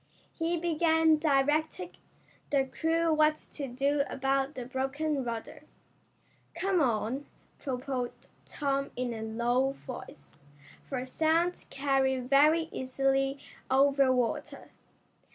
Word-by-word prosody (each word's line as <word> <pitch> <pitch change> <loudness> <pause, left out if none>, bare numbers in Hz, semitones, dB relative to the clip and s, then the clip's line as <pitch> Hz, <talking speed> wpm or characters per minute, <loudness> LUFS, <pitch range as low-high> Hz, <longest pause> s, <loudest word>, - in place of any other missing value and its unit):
He 335 +1 -1
began 320 -1 +3
directing 310 +4 +1 0.6
the 275 -2 +2
crew 325 +4 +1
what 305 0 +4 0.2
to 280 -3 -4
do 275 +3 +1
about 270 +1 0
the 250 -2 -5
broken 270 +3 -2
rudder. 230 -2 -5 0.9
"Come 380 -3 +1
on," 250 +2 0 0.3
proposed 255 -2 -4 0.2
Tom 275 -1 -2
in 245 -1 -2
a 220 - -6
low 240 +4 0
voice, - - -9 0.6
for 255 -2 -3
sounds 325 +6 0
carry 270 -1 +1
very 285 +6 +4
easily 270 +1 0 0.3
over 275 0 +4
water. 250 -2 -2
275 Hz, 105 wpm, -30 LUFS, 260-310 Hz, 0.9 s, what